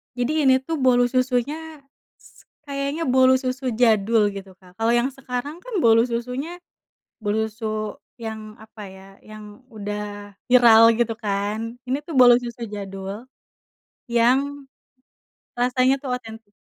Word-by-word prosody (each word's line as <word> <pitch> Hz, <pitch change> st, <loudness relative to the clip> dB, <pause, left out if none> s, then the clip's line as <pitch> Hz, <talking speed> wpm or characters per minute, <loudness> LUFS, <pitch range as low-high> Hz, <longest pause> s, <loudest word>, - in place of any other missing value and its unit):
Jadi 285 Hz, +5 st, 0 dB
ini 260 Hz, -, +6 dB
tuh 320 Hz, +2 st, -3 dB
bolu 245 Hz, -2 st, +3 dB
susunya 275 Hz, +5 st, -2 dB, 0.3 s
s -, -, -21 dB, 0.2 s
kayaknya 280 Hz, +2 st, -3 dB
bolu 260 Hz, 0 st, +5 dB
susu 255 Hz, 0 st, -2 dB
jadul 220 Hz, -2 st, +3 dB
gitu 195 Hz, -1 st, -9 dB
Kak, 180 Hz, -1 st, -20 dB
kalau 225 Hz, +1 st, +2 dB
yang 240 Hz, +2 st, +2 dB
sekarang 270 Hz, +4 st, -6 dB
kan -, -, -10 dB
bolu 230 Hz, 0 st, +5 dB
susunya, 250 Hz, +8 st, -4 dB, 0.6 s
bolu 215 Hz, +1 st, 0 dB
su 215 Hz, -1 st, -4 dB, 0.2 s
yang 220 Hz, -1 st, -7 dB
apa 220 Hz, -1 st, -12 dB
ya 190 Hz, 0 st, -13 dB, 0.2 s
yang 215 Hz, +2 st, -13 dB
udah 205 Hz, -1 st, -7 dB
viral 230 Hz, -2 st, +7 dB
gitu 230 Hz, -1 st, -1 dB
kan 210 Hz, +1 st, -3 dB, 0.2 s
ini 275 Hz, +3 st, -2 dB
tuh 330 Hz, -, -8 dB
bolu 245 Hz, -2 st, +7 dB
susu 240 Hz, -1 st, -5 dB
jadul, 195 Hz, +1 st, -7 dB, 0.9 s
yang, 270 Hz, +4 st, +1 dB, 0.9 s
rasanya 255 Hz, +2 st, +2 dB
tuh 265 Hz, -, -4 dB
otentik. 225 Hz, -3 st, -7 dB
235 Hz, 135 wpm, -22 LUFS, 215-260 Hz, 0.9 s, viral